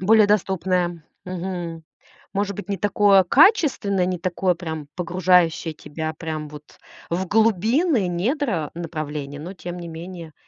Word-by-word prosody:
Более 215 +3 +5
доступное. 185 -4 0 0.2
Мгм. 175 -3 -5 0.5
Может 200 -1 -1
быть, 205 -1 -7
не 200 - -1
такое 200 0 +4
качественное, 245 - +4
не 180 -1 -2
такое 180 +1 0
прям 160 -4 -6
погружающее 175 -2 +2
тебя 155 +1 -5
прям 155 -2 -5
вот 150 0 -13 0.3
в 185 +3 -1
глубины 225 - +2
недра 190 - -1
направления, 150 -4 -5
но 165 +5 -7
тем 180 -1 -7
не 175 - -7
менее. 165 0 -8
180 Hz, 130 wpm, -23 LUFS, 165-200 Hz, 0.5 s, Более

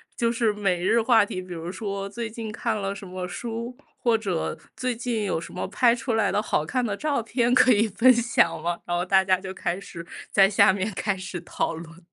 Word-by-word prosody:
就 230 -1 +1
是 230 -2 +1
每 190 -4 -1
日 230 +4 +4
话 225 -2 +5
题， 185 - -5
比 180 -1 -8
如 165 +1 -5
说 195 0 -4
最 230 +3 -5
近 220 -1 -6
看 220 +1 -2
了 195 -1 -2
什 200 -1 -9
么 180 0 -5
书， 235 +5 -5 0.2
或 235 -2 +2
者 195 -7 -2 0.2
最 255 -1 -2
近 230 -2 -2
有 180 -4 -1
什 170 - -9
么 180 - -4
拍 240 -2 +3
出 240 0 -3
来 225 - +2
的 - - +1
好 210 - 0
看 245 +10 -1
的 205 -3 -2
照 280 0 -1
片 235 +1 0
可 255 0 +6
以 220 +1 +3
分 255 +6 +5
享 235 -8 +2
吗？ 170 +1 -1
然 175 - -1
后 175 - 0
大 190 +1 +4
家 185 -1 +3
就 190 0 -7
开 175 +1 -2
始 170 -4 -9 0.3
在 195 -1 +6
下 195 -1 +5
面 200 +2 -2
开 205 0 -1
始 185 -1 -6
讨 170 - -2
论。 165 +1 -10
205 Hz, 250 characters per minute, -25 LUFS, 185-235 Hz, 0.3 s, 可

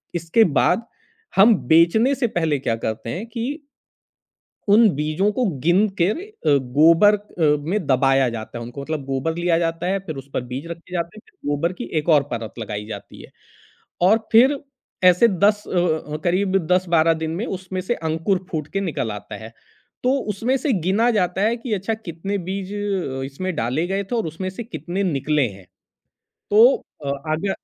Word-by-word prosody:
इसके 170 +7 +3 0.2
बाद 225 +6 +2 0.5
हम 210 +3 +7
बेचने 170 +11 +4
से 255 -2 0
पहले 160 -8 0
क्या 120 -4 -1
करते 115 0 -4
हैं 185 - -4
कि 245 +6 -4 1.1
उन 215 +2 +6
बीजों 155 +8 0
को 250 +3 0
गिन 180 +8 +3
कर 200 - +2
अ, 410 - 0 0.2
गोबर 165 +8 +6
अ, 165 -7 0
में 200 -4 -1
दबाया 135 0 +3
जाता 115 0 -7
है 120 - -6
उनको, 120 +4 -8
मतलब 150 -1 -4
गोबर 135 +4 -2
लिया 175 -1 +2
जाता 165 +1 -2
है 195 +1 0
फिर 155 - -5
उस 135 +1 -10
पर - - -1
बीज 135 +6 -5
रखे 170 +1 -9
जाते 170 +3 -3
हैं - - -11
फिर 380 - -8
गोबर 165 +5 0
की - - -7
एक 150 - -4
और 150 -3 +5
परत 115 -2 -4
लगाई 105 -1 -5
जाती 110 - -9
है - - -14 0.8
और 220 - +5
फिर 265 +5 +5 0.4
ऐसे 180 +5 +6
10 205 +1 +2
अ - - -8 0.4
अ, 150 - -1
करीब 190 +2 +2
10-12 170 -3 +3
दिन 160 - -2
में 215 +7 -3
उसमें 185 0 -5
से 240 - -1
अंकुर 165 +4 -1
फूट 155 -3 -3
के 195 - 0
निकल 150 - -2
आता 105 +1 -8
है। 115 - -10 0.5
तो 255 - +3 0.2
उसमें 235 +7 0
से 280 +1 -1
गिना 195 +6 +2
जाता 190 -3 0
है 225 +3 +2
कि 230 -2 -4
अच्छा, 200 +3 -1
कितने 200 -1 -4
बीज 195 +1 -4
अ, 195 -10 -2
इसमें 180 +8 -4
डाले 130 +8 -1
गए 195 +1 -1
थे 220 +5 -4
और 225 - 0
उसमें 180 +4 -4
से 195 +5 -7
कितने 195 -3 -4
निकले 150 -5 +1
हैं। 95 -1 -14 0.8
तो 215 +3 +7 0.4
अ, 140 - -1 0.2
आगे 165 +6 -1
175 Hz, 185 wpm, -22 LUFS, 150-205 Hz, 1.1 s, हम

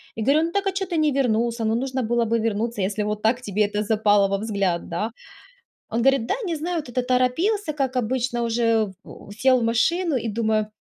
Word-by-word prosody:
И 225 - -4
говорю: 290 +6 +3
"Ну 335 - -4
так, 400 +2 -1
а 390 - +2
чё 385 +1 -2
ты 345 - -2
не 305 -1 +3
вернулся? 235 -3 0
Ну, 220 +1 +1
нужно 260 +2 -2
было 235 +1 +1
бы 230 +1 +1
вернуться, 225 0 -1
если 205 +2 -1
вот 210 0 -3
так 235 +3 +1
тебе 210 -3 -2
это 210 +1 -2
запало 205 -2 +3
во 195 0 0
взгляд, 200 -5 -1
да?" 210 +7 -2 0.8
Он 230 - -1
говорит, 270 -1 +3
да, - - 0
не 335 - -1
знаю, 345 +4 -3
вот 305 -5 -5
это 245 +1 -1
торопился, 305 - +1
как 270 -3 -2
обычно 245 0 -1
уже 230 -2 +1
в 200 - -13
сел 255 +2 +4
в 235 - -2
машину 320 +9 +1
и 235 - -3
думаю: 215 -1 0
235 Hz, 220 wpm, -23 LUFS, 215-270 Hz, 0.8 s, сел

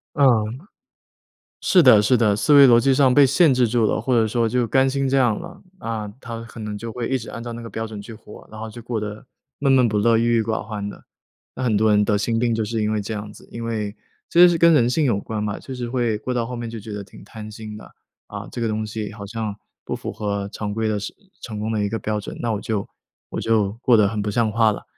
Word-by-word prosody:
嗯， 145 -3 +4 1.4
是 185 - +5
的 125 -8 +7
是 105 +5 +3
的， 110 -4 +3
思 145 +8 +2
维 140 -1 +9
逻 120 -1 +7
辑 135 +3 +3
上 130 -1 +4
被 145 +1 +7
限 140 +3 +4
制 125 -1 +3
住 115 0 +2
了， - - +1
或 125 +4 -1
者 115 -2 +3
说 115 +1 +1
就 120 +1 0
甘 135 +3 +3
心 135 0 -1
这 135 - +2
样 120 -5 +2
了。 175 +3 -10 0.2
啊， 115 -5 -4
他 115 -1 -6
可 115 0 -12
能 105 -1 -5
就 115 +2 -6
会 120 0 -4
一 135 - +1
直 115 - -9
按 115 - -7
照 120 -1 -6
那 120 - -7
个 115 - -8
标 110 0 -4
准 110 -2 -8
去 115 - -10
活， 105 -1 -13
然 110 - -9
后 110 0 -6
就 120 +2 -10
过 115 -1 -3
得 105 +2 -6 0.3
闷 140 -1 +2
闷 130 -3 +5
不 105 - 0
乐、 115 +2 +3
郁 115 0 +2
郁 110 - +2
寡 110 0 -2
欢 105 -2 -5
的。 - - -10 0.5
那 130 - -4
很 115 -4 +1
多 110 +1 +3
人 105 0 +4
得 105 - +2
心 115 +3 -1
病 120 0 +1
就 110 0 0
是 110 +1 -2
因 105 - 0
为 110 -1 0
这 100 +2 -5
样 105 0 -6
子。 - - -16
因 115 - -6
为 110 -3 -3 0.3
其 170 - +2
实 180 - +10
是 170 - +1
跟 170 0 +6
人 120 -6 +4
性 150 +4 +1
有 115 -7 +1
关 110 +1 -4
嘛， 105 -1 -3
就 135 - -8
是 125 -2 -4
会 120 -3 0
过 125 - -3
到 120 -2 0
后 125 +2 -6
面 120 -1 -5
就 115 0 -7
觉 105 0 -8
得 105 -1 -5
挺 95 - -15
贪 110 -1 -10
心 110 0 -8
的。 - - -13 0.4
啊， - - -7
这 120 - -5
个 115 - +1
东 110 0 -2
西 105 -1 -5
好 105 -2 -9
像 110 0 -4 0.3
不 - - -4
符 - - -6
合 100 -1 -3
常 105 -1 -4
规 110 +1 -1
的 105 -1 0
是 100 - -6 0.3
成 110 -3 -6
功 110 +1 -2
的 110 -2 0
一 100 - -1
个 115 - -2
标 105 -1 -2
准， 105 - -8
那 120 - -1
我 105 -2 -2
就 105 -3 -2 0.4
我 - - -4
就 110 -3 +1
过 120 -3 +5
得 105 -2 +4
很 105 +1 -2
不 105 - -2
像 115 -1 +1
话 110 0 +3
了， 105 - -6
115 Hz, 305 characters per minute, -22 LUFS, 105-120 Hz, 1.4 s, 实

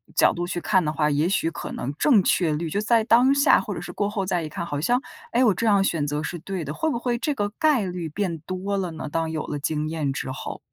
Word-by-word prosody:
角 - - +5
度 175 0 -3
去 175 0 -3
看 185 0 +2
的 150 - 0
话， 150 0 +1
也 150 +4 +1
许 165 -4 +1
可 - - -7
能 135 +3 -4
正 240 -10 +5
确 175 -2 +2
率 160 +1 -2
就 200 +6 -1
在 225 0 +3
当 250 +4 +5
下 280 0 +5
或 - - -5
者 - - -5
是 - - -7
过 205 0 -1
后 200 -3 -2
再 180 -2 0
一 155 - -5
看， 170 - -5
好 145 -2 -3
像 245 +8 +2 0.3
“诶， 245 - +2
我 210 - +5
这 230 - -2
样 200 -3 +4
选 160 -6 0
择 150 +1 -2
是 175 - -4
对 180 -2 -5
的”， 150 - -4
会 320 - -1
不 235 - -1
会 245 -1 -1
这 295 +4 -1
个 205 -5 -1
概 290 -10 +3
率 175 -3 -4
变 175 0 -2
多 185 +5 -4
了 180 -3 -2
呢， 160 - -6
当 165 +1 -1
有 155 -1 -3
了 145 - -3
经 150 +1 -2
验 155 -4 -1
之 135 - -4
后？ - - -6
180 Hz, 300 characters per minute, -24 LUFS, 155-210 Hz, 0.3 s, 角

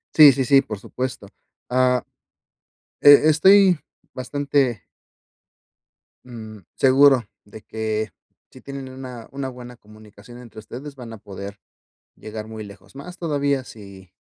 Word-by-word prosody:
Sí, 150 -3 +10
sí, 130 0 -1
sí, 135 +2 +5
por 110 -6 -7
supuesto. 125 +1 -6 0.4
Ah, 125 0 +2 1.0
e 145 +1 +8
estoy 190 +2 +5 0.3
bastante 135 -4 -1 1.4
mm, 110 -3 -10 0.2
seguro 135 -1 +5 0.2
de 105 +1 -13
que 110 -1 -3 0.4
si 130 - -15
tienen 140 -1 -8
una 130 -3 -10
una 135 -1 -4
buena 125 -1 -11
comunicación 110 +1 -16
entre 115 -3 -12
ustedes 135 +6 -10
van 120 -4 -10
a 110 - -10
poder 100 +1 -9 0.6
llegar 110 0 -8
muy 110 -1 -8
lejos. 100 +2 -15
Más 175 +6 -10
todavía 140 -4 -1
si 100 -5 -13
125 Hz, 125 wpm, -22 LUFS, 110-140 Hz, 1.4 s, Sí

